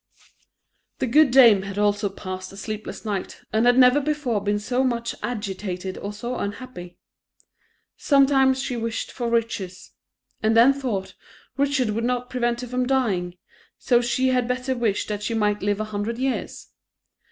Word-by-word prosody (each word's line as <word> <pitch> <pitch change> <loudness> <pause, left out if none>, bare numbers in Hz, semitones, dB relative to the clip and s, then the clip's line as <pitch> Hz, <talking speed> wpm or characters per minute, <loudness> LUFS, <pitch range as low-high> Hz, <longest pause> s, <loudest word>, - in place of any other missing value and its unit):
The - - -1
good 290 +4 +5
dame 240 -6 +7
had 195 +1 -7
also 205 0 +1
passed 185 -1 -7
a 195 - -12
sleepless 215 +2 -6
night, 200 -3 -4
and 220 +2 +3
had 245 0 +5
never 255 +2 +6
before 280 -7 -1
been 205 +1 0
so 245 +5 -1
much 235 -2 -1
agitated 195 -5 -4
or 200 - -5
so 240 +4 -5
unhappy; 200 -4 -7 1.0
sometimes 270 -2 +4
she 260 -2 -3
wished 230 -1 -3
for 240 -2 -3
riches, 220 -6 -2 0.5
and 220 +1 +2
then 245 +4 +7
thought, 240 -9 -3 0.4
riches 275 -4 +1
would 225 +2 -2
not 250 0 -2
prevent 240 -1 -1
her 250 - -6
from 250 +1 -1
dying 195 -10 0 0.4
so 240 -1 +2
she 255 +2 +1
had 250 -2 +1
better 255 +1 -1
wish 225 -5 0
that 210 -1 -4
she 220 +2 -2
might 210 -1 +1
live 205 0 0
a 215 - -1
hundred 210 +3 -2
years. 260 +1 -3
235 Hz, 165 wpm, -23 LUFS, 205-255 Hz, 1.0 s, dame